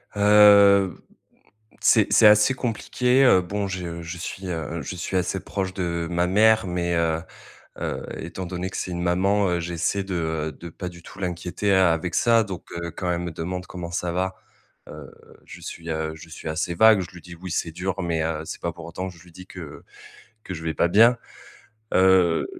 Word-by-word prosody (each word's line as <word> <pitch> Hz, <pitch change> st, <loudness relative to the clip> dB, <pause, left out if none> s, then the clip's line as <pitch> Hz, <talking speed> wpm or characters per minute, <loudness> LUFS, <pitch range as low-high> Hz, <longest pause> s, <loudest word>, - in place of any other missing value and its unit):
Heu, 100 Hz, -2 st, +6 dB, 0.9 s
c'est -, -, +4 dB
c'est -, -, +6 dB
assez 105 Hz, +5 st, +6 dB
compli 120 Hz, -4 st, -4 dB
qué. 125 Hz, +2 st, +3 dB
Heu, 95 Hz, -8 st, +5 dB
bon, 100 Hz, +3 st, -3 dB
je 85 Hz, -3 st, -5 dB
je 85 Hz, +1 st, -7 dB
suis, 95 Hz, +2 st, -6 dB
heu, 80 Hz, -1 st, -4 dB
je 90 Hz, -, -6 dB
suis 90 Hz, +2 st, -3 dB
assez 90 Hz, +1 st, -1 dB
proche 95 Hz, -2 st, -4 dB
de 85 Hz, -3 st, -2 dB
ma 85 Hz, 0 st, +1 dB
mère, 110 Hz, +3 st, +4 dB
mais 85 Hz, -1 st, -1 dB
heu, 80 Hz, -1 st, +1 dB, 0.6 s
heu, -, -, -3 dB, 0.2 s
étant 90 Hz, +3 st, -6 dB
donné 90 Hz, +1 st, -4 dB
que -, -, -7 dB
c'est 90 Hz, -, -4 dB
une 85 Hz, 0 st, -3 dB
maman, 95 Hz, +3 st, +2 dB
heu, 85 Hz, -1 st, 0 dB
j'essaie 85 Hz, +3 st, -2 dB
de, 95 Hz, -, -5 dB
heu, 80 Hz, -2 st, -2 dB
de 85 Hz, -, -10 dB
pas 90 Hz, +2 st, -7 dB
du 85 Hz, -1 st, -13 dB
tout 90 Hz, -, -13 dB
l'inquiéter 90 Hz, +2 st, -2 dB
a 95 Hz, -3 st, +4 dB
avec 85 Hz, +2 st, -3 dB
ça. 115 Hz, -1 st, +4 dB
Donc 95 Hz, -3 st, -8 dB
heu, 85 Hz, -, -4 dB
quand 90 Hz, +2 st, -4 dB
elle 85 Hz, 0 st, -1 dB
me 90 Hz, -, -4 dB
demande 90 Hz, +3 st, -5 dB
comment 85 Hz, -2 st, -7 dB
ça 85 Hz, 0 st, -2 dB
va, 95 Hz, +1 st, -1 dB, 0.6 s
heu, -, -, -10 dB, 0.3 s
je -, -, -11 dB
suis, 85 Hz, 0 st, -8 dB
heu, 80 Hz, -1 st, -2 dB
je 80 Hz, +1 st, -13 dB
suis 80 Hz, -, -9 dB
assez 80 Hz, +2 st, -2 dB
vague. 110 Hz, 0 st, +6 dB
Je 90 Hz, -, -7 dB
lui 85 Hz, -, -12 dB
dis: 85 Hz, 0 st, -11 dB
«Oui, 90 Hz, +1 st, -8 dB
c'est 85 Hz, -, -2 dB
dur», 95 Hz, +3 st, -3 dB
mais 85 Hz, -2 st, -1 dB
heu, 80 Hz, -1 st, -2 dB
c'est -, -, -7 dB
pas 85 Hz, -, -2 dB
pour 85 Hz, -1 st, -11 dB
autant 90 Hz, +3 st, -5 dB
que 90 Hz, -, -13 dB
je -, -, -17 dB
lui 90 Hz, -, -18 dB
dis 90 Hz, +2 st, -12 dB
que 85 Hz, -7 st, -10 dB, 0.6 s
que 95 Hz, -, -7 dB
je 80 Hz, -, -8 dB
vais 80 Hz, -1 st, -2 dB
pas 85 Hz, -, +2 dB
bien. 115 Hz, +6 st, +5 dB, 0.8 s
Heu, 95 Hz, -3 st, +4 dB
90 Hz, 210 wpm, -24 LUFS, 85-95 Hz, 0.9 s, Heu